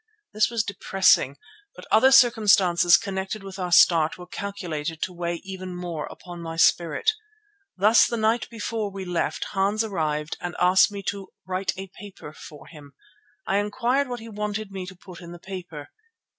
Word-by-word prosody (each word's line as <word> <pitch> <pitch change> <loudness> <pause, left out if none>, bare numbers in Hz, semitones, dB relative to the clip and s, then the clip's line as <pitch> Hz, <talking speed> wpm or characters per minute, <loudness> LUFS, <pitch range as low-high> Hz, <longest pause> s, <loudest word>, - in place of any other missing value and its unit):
This 215 +1 +2
was 230 -2 -1
depressing, 190 -8 +2 0.4
but - - -12
other 260 +5 +5
circumstances 200 -9 +5
connected 195 +1 -5
with 195 0 -9
our 180 -1 -3
start 165 -2 +5
were 180 - -10
calculated 170 -5 -5
to 185 - -4
weigh 170 -1 -3
even 185 -2 -7
more 175 -4 -5
upon 175 -1 -10
my 165 -1 -6
spirit. 170 - +2 0.7
Thus 210 +4 +5
the 235 - -3
night 220 +2 +1
before 225 -2 -4
we 195 -1 -7
left 175 -2 -2
Hans 200 +3 +1
arrived 155 -7 -3
and 175 0 -5
asked 185 +3 +5
me 200 -1 -7
to 195 -1 -4 0.2
"write 185 +1 -2
a 190 - -6
paper" 190 -6 -11
for 150 -1 -13
him. 145 -3 -14 0.5
I 195 - 0
inquired 245 +6 0
what 245 -2 -5
he 225 - -10
wanted 210 -1 -4
me 190 -2 -6
to 185 - -10
put 180 0 -13
in 170 0 -10
the 175 - -11
paper. 175 -6 -9
190 Hz, 170 wpm, -24 LUFS, 175-210 Hz, 0.7 s, other